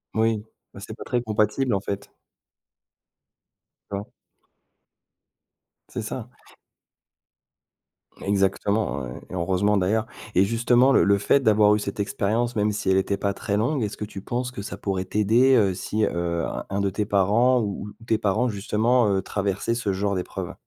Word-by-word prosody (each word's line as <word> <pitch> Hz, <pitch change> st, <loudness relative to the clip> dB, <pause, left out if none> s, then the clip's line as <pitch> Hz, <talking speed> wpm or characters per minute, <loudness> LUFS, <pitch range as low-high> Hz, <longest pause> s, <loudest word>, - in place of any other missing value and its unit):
Oui, 110 Hz, -1 st, +1 dB, 0.3 s
bah -, -, -10 dB
c'est 110 Hz, +2 st, -8 dB
pas -, -, -7 dB
très 125 Hz, -1 st, -1 dB
compatible 110 Hz, +3 st, 0 dB
en 95 Hz, -, -1 dB
fait. 100 Hz, 0 st, -5 dB, 1.8 s
D'accord. 100 Hz, +4 st, -5 dB, 1.8 s
C'est -, -, -4 dB
ça. -, -, -6 dB, 1.9 s
Exactement 100 Hz, -5 st, 0 dB
et -, -, -7 dB, 0.2 s
et -, -, -10 dB
heureusement 95 Hz, +4 st, +1 dB
d'ailleurs. 105 Hz, +4 st, +1 dB, 0.3 s
Et 95 Hz, -, +6 dB
justement 120 Hz, +5 st, +3 dB
le -, -, +5 dB
le 100 Hz, 0 st, +4 dB
fait 100 Hz, +7 st, +3 dB
d'avoir 105 Hz, -4 st, +4 dB
eu -, -, -1 dB
cette 100 Hz, 0 st, -5 dB
expérience, 110 Hz, +4 st, -1 dB
même 105 Hz, 0 st, +1 dB
si 100 Hz, -2 st, -2 dB
elle 95 Hz, -, +4 dB
était 100 Hz, +1 st, 0 dB
pas 100 Hz, 0 st, -1 dB
très 100 Hz, -, -2 dB
longue, 120 Hz, +7 st, 0 dB
est-ce 105 Hz, -, -3 dB
que -, -, -5 dB
tu 100 Hz, -2 st, -9 dB
penses 125 Hz, +4 st, -3 dB
que 115 Hz, -, -7 dB
ça 100 Hz, -, -6 dB
pourrait 95 Hz, -2 st, -2 dB
t'aider, 115 Hz, +7 st, +3 dB
heu, 100 Hz, -5 st, +3 dB
si, 105 Hz, +4 st, -2 dB
heu, 85 Hz, -1 st, -1 dB
un -, -, -5 dB
un 100 Hz, +1 st, -1 dB
de 100 Hz, -, +1 dB
tes 105 Hz, +3 st, -2 dB
parents 110 Hz, +6 st, +3 dB
ou 105 Hz, -1 st, -4 dB
ou -, -, -16 dB
tes 110 Hz, -, +2 dB
parents 110 Hz, +4 st, +1 dB
justement, 110 Hz, +3 st, +1 dB
heu, 95 Hz, -1 st, +1 dB
traversaient 100 Hz, +3 st, -2 dB
ce 105 Hz, -4 st, -1 dB
genre 100 Hz, +1 st, -1 dB
d'épreuve? 90 Hz, -, -4 dB
105 Hz, 170 wpm, -24 LUFS, 100-115 Hz, 1.9 s, Et